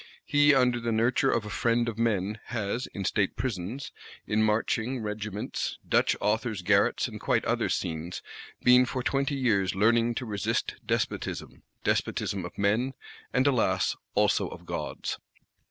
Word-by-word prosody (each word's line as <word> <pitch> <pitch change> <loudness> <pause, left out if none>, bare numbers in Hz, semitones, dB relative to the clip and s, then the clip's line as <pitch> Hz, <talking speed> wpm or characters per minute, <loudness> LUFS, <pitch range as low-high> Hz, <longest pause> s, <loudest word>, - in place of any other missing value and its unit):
He, 145 0 +5
under 125 -2 +3
the 115 0 -2
nurture 115 +3 +2
of 115 -2 +1
a 105 - -6
"Friend 120 +1 +1
of 115 -1 -4
Men," 105 -2 0
has, 115 +1 -2
in 100 -2 -6
State 100 0 +1
Prisons, 110 +2 -4 0.3
in 105 +1 +1
marching 110 +3 0
Regiments, 105 +2 -3
Dutch - - +3
Authors" 110 -2 0
garrets, 100 +2 +3
and - - -8
quite - - +1
other - - +1
scenes, 85 0 -3 0.4
"been 125 0 +7
for 130 -1 -3
twenty 135 +4 0
years 105 -8 +1
learning 115 +3 +3
to 125 - -3
resist 105 -4 -1
despotism:" - - -2 0.2
despotism 95 -3 0
of 90 - -9
men, 110 +7 +1 0.4
and 130 +1 +2
alas 110 -10 +2 0.2
also - - +3
of - - -10
gods. - - -4
110 Hz, 150 wpm, -28 LUFS, 100-125 Hz, 0.4 s, been